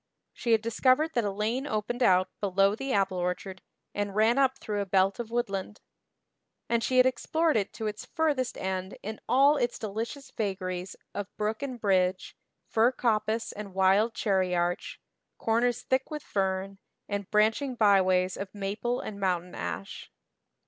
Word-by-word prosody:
She 235 - 0
had 220 0 +3
discovered 255 +7 +2
that 235 - +1
a - - +1
lane 220 +7 -2
opened 220 +2 -2
out 185 -4 +5
below 195 0 +3
the 270 +5 -4
apple 195 -3 +1
orchard 180 +1 -3 0.3
and 205 -1 -3
ran 225 +5 +4
up 265 -1 +3
through 210 -5 -3
a - - -2
belt 195 +2 +2
of 235 -2 -4
woodland; 210 -3 -2 0.9
and 235 -1 +1
she 255 - +1
had 255 - +7
explored 315 +5 +1
it 205 -2 0
to 220 - -5
its 215 +3 -4
furthest 290 -6 0
end 190 0 -3
in 215 +1 -5
all 280 +3 +5
its 240 -2 0
delicious 230 +6 -5
vagaries 185 -3 -3 0.2
of 205 -1 -4
brook 215 +2 -1
and 260 -3 -4
bridge, 185 -3 +1 0.3
fir 230 +3 +3
coppice 225 -2 0
and 200 -2 -8
wild 195 +4 +3
cherry 190 -4 +1
arch, 175 0 -1 0.4
corners 235 +1 +1
thick 260 0 0
with 300 -1 -5
fern, 195 0 -2 0.3
and 200 -2 -4
branching 225 +5 +2
byways 185 -4 +3
of 195 0 -6
maple 210 +5 -2
and 200 -2 -7
mountain 180 -2 -1
ash. 85 +3 -6
210 Hz, 160 wpm, -28 LUFS, 190-240 Hz, 0.9 s, had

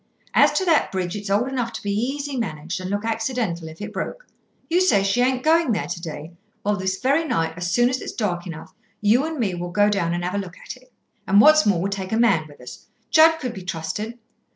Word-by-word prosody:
As - - +5
to 380 - 0
that 330 -4 +3
bridge, 185 -1 -2
it's 205 -1 -6
old 205 +6 +2
enough 250 -3 -2
to - - -7
be 205 - -1
easy 270 +7 -2
managed, 175 -6 -4
and 185 - -5
look 205 +2 -2
accidental 225 -7 -2
if 160 0 -11
it 210 +1 -6
broke. - - -5 0.4
You 350 +2 +2
say 210 - +4
she 200 +5 +1
ain't 255 0 +1
going 320 -5 +3
there - - -1
to 175 -1 -5
day. 155 -1 -7 0.3
Well, 210 0 +1
this 190 -1 -2
very 280 +5 +2
night, 165 - -1
as 175 0 -3
soon 240 +3 +4
as 255 +1 -1
it's - - -5
dark 180 -5 -2
enough, 160 -2 -9 0.3
you 220 +6 +3
and 320 0 -4
me 210 -8 0
will 175 0 -4
go 205 +3 +3
down 175 -4 0
and 175 - -3
have 180 +2 -2
a 200 - 0
look 180 -3 -7
at - - -9
it. 255 0 -21 0.4
And 195 +1 +5
what's 305 +3 +6
more, 195 -4 +3
we'll 195 +2 -1
take 190 -1 -4
a 220 - +1
man 195 -10 +3
with 145 - -16
us. 125 - -11 0.2
Judd 320 +1 +6
could 250 -6 -4
be 190 - -8
trusted. 180 +7 -4
205 Hz, 245 wpm, -22 LUFS, 180-255 Hz, 0.4 s, what's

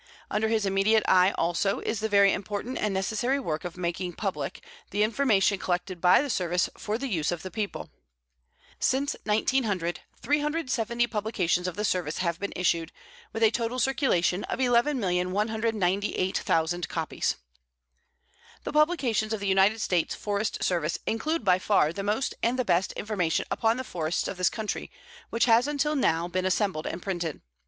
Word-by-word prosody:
Under 215 +1 +1
his 220 -2 +1
immediate 195 +3 +3
eye 185 0 +6
also 175 +4 0
is 220 - -2
the 220 0 -1
very 200 -1 +5
important 205 +5 -4
and 210 - 0
necessary 220 +8 0
work 155 - -3
of 175 0 -6
making 175 0 -3
public 195 +2 -4 0.3
the 205 - +1
information 215 -4 +2
collected 180 0 -2
by 180 +8 +6
the 290 - -4
Service 180 -3 0
for 215 +1 -3
the 275 +3 -4
use 165 - 0
of 175 -2 -4
the 185 - -6
people. 215 -2 -4 0.9
Since 275 +2 +1
1900, 210 -5 0 0.2
370 270 -6 0
publications 205 -6 -1
of 180 - -4
the 210 - -1
Service 175 -6 -1
have 170 -2 -1
been 200 - -3
issued, 170 -2 0 0.4
with 225 - -2
a 220 - +6
total 235 +1 -2
circulation 230 - +1
of - - -3
11,198,000 205 - 0
copies. 160 -2 -1 1.3
The - - -5
publications 280 -9 +2
of 220 - -2
the 200 - -5
United 195 +3 +3
States 175 -5 0
Forest 205 +1 -2
Service 170 -3 0
include 300 +4 -1
by 185 -1 +4
far 185 -6 +2
the 195 - -4
most 210 +6 -1
and 240 +2 +1
the 255 - 0
best 180 0 +2
information 190 -6 -1
upon 225 +1 +1
the 260 - -3
forests 170 -7 -2
of 195 - -5
this 185 -1 +3
country 220 -2 -4 0.4
which 230 - +2
has 235 +2 +4
until 295 +1 0
now 170 - +1
been 185 +1 -2
assembled 185 -4 0
and 170 - -5
printed. 175 -5 -3
205 Hz, 165 wpm, -27 LUFS, 180-230 Hz, 1.3 s, eye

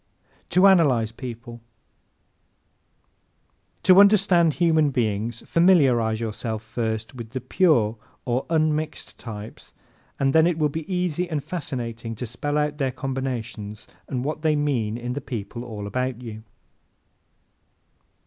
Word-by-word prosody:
To 185 +2 +4
Analyze 140 - +4
People 120 -1 -8 2.2
¶ - - -42
To 185 0 +7
understand 195 -6 +5
human 160 -3 +3
beings 115 -2 -1
familiarize 135 -11 +3
yourself 110 -1 -4
first 110 0 -3
with 115 -3 -8
the 130 +3 -4
PURE 125 - +2 0.3
or 125 +1 -1
UNMIXED 155 -1 -1
types 110 -2 -9 0.4
and 135 0 +2
then 160 +1 +5
it 175 -2 0
will 150 -2 +2
be 160 +4 -6
easy 180 -1 -1
and 150 -4 -2
fascinating 115 -8 -5
to 125 - -5
spell 145 +6 -3
out 150 0 -1
their 135 -2 +1
combinations 125 -5 -5 0.2
and 130 -2 -3
what 155 +1 -3
they 155 -1 +2
mean 125 -7 0
in 120 +1 -4
the 145 - -4
people 120 0 -6
all 110 -4 -7
about 125 +3 -2
you. 110 -3 -8
130 Hz, 130 wpm, -24 LUFS, 115-155 Hz, 2.2 s, To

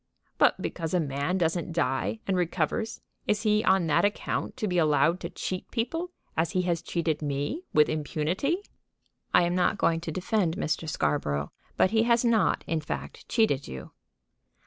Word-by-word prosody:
"But - - +4
because 165 0 -3
a - - +3
man 145 +3 -1
doesn't 170 -1 0
die 160 - 0
and 195 - 0
recovers, 180 +6 -1 0.3
is 210 +1 +1
he 215 -1 +3
on 190 -2 +3
that 155 +3 +3
account 205 +5 -1
to 220 -5 -1
be 180 -2 +1
allowed 155 +2 +3
to - - -5
cheat 185 -1 -5
people, 325 +10 -2 0.3
as 160 +1 0
he 185 - +2
has 170 -2 0
cheated 160 -3 -1
me, 145 - -2
with 150 -1 +5
impunity?" 165 - -1 0.7
"I - - +5
am 175 0 +1
not 180 +2 +2
going 165 -4 +2
to 165 - -4
defend 185 0 0
Mr. 155 +1 -1
Scarborough; 75 - -1 0.3
but 185 - +4
he 220 0 +4
has 235 +1 +3
not, 220 -7 +3
in 160 -1 -1
fact, 150 - -6
cheated 180 - +2
you." 65 0 -8
175 Hz, 170 wpm, -28 LUFS, 155-210 Hz, 0.7 s, with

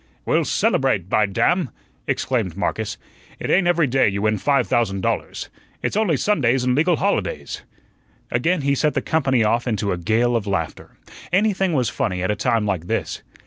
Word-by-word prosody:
"We'll - - +2
celebrate, 90 - +1
by 105 0 +3
damn!" 165 - +1 0.4
exclaimed - - -1
Marcus. - - -2 0.4
"It - - -3
ain't 180 -1 +3
every 170 -2 +3
day 135 -3 +3
you 100 +1 -3
win 110 -1 +1
five 140 +4 +2
thousand 100 -5 0
dollars. - - -3 0.3
It's - - -1
only 205 -9 +2
Sundays 135 - +1
and 125 0 +2
legal 165 +6 +3
holidays." - - -2 0.7
Again 160 +8 +1
he 140 0 +1
set 150 +2 +1
the - - 0
company 135 -7 +2
off 115 +3 +1
into 105 -3 -1
a 90 - -2
gale 115 +6 +1
of 110 -3 -1
laughter. 80 -6 -4 0.3
Anything 195 -1 +2
was 130 -5 +1
funny 90 -1 -2
at 95 - +1
a - - 0
time 115 0 +1
like 90 -5 -2
this. - - -2
120 Hz, 180 wpm, -21 LUFS, 105-160 Hz, 0.7 s, by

